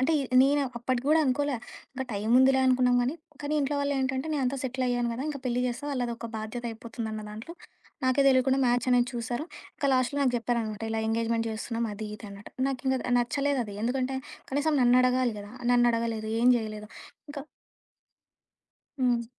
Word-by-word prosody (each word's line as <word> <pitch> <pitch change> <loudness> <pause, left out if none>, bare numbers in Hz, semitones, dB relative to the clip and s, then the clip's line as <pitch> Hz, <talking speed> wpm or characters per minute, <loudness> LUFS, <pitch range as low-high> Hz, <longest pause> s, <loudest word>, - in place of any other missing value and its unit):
అంటే, 265 +5 +2
ఇ - - -1 0.2
నేన 285 +2 +3 0.2
అప్పటికి 245 +1 -1
గూడా 315 - +5
అనుకోలా. 280 +1 0 0.4
ఇంక 265 0 -3
టైం 205 +2 -2
ఉందిలే 265 0 +5
అనుకున్నాం 250 -1 +4
గానీ, 255 +5 -1 0.3
కానీ 290 +1 -2
ఇంట్లో 285 +1 0
వాళ్ళేంటంటే 265 -1 -1
నేనంతా 270 -1 0
సెటిలయ్యాను 245 -2 0
కదా! 250 +3 -4
ఇంక 295 -2 -4
పెళ్లి 250 -1 0
చేస్తా 245 +4 -4
వాళ్ళధొక 240 -3 -3
బాధ్యత 220 +3 -5
అయిపోతుందన్న 225 -1 -6
దాంట్లో. 220 +11 -8 0.5
నాకే 260 +2 +3
తెలియకుండా 265 0 +3
మ్యాచ్ 245 +1 +1
అనేది 245 -1 +4
చూసారు. 240 +4 -3 0.3
ఇంక - - -5
లాస్ట్‌లో 255 +2 +1
నాకు 255 -2 +2
చెప్పారనమాట. 230 -2 -2
ఇలా 225 - -1
ఎంగేజ్‌మెంట్ 230 0 0
చేస్తున్నాం 230 +1 -3
అది 215 +1 -6
ఇది 210 0 -10
అన్నటు. 200 +1 -11 0.2
నాకింక 265 0 -1 0.2
నచ్చలేదది. 245 -3 -1
ఎందుకంటే, 260 +2 -1 0.3
కనీసం 290 +3 +1
నన్నడగాలి 250 -1 +3
కదా! 205 +1 -9 0.2
నన్నడగలేదు. 230 -2 +1
ఏం 245 - +6
జేయలేదు. 215 -2 -5 0.4
ఇంకా 285 -1 -6 1.6
హ్మ్. 245 -2 +2
245 Hz, 155 wpm, -28 LUFS, 230-265 Hz, 1.6 s, ఏం